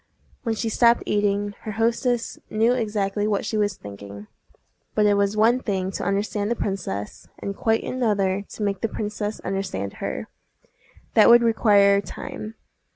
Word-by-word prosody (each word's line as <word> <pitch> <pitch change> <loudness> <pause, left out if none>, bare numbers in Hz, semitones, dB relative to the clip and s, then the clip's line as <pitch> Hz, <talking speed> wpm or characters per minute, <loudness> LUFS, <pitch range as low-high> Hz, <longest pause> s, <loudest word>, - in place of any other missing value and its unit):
When 225 -2 -1
she 225 - -2
stopped 235 +1 +4
eating, 205 0 0
her 215 - -5
hostess 235 +2 0
knew 225 +3 +3
exactly 210 -3 -1
what 205 -1 0
she 220 - -2
was 205 -3 0
thinking; 100 0 -10 0.7
but 210 - +3
it 205 - +5
was 200 +1 +1
one 230 +4 +4
thing 190 -5 -2
to - - -4
understand 205 +1 -1
the 235 - +1
princess, 140 - -4
and 200 - -5
quite 225 +2 +1
another 205 -6 0
to 215 - -5
make 200 -2 -1
the 225 - 0
princess 210 0 -4
understand 185 - -3
her: - - -3 0.9
that - - +7
would 235 0 +8
require 205 -3 +4
time. 215 +2 -7
205 Hz, 160 wpm, -24 LUFS, 195-225 Hz, 0.9 s, would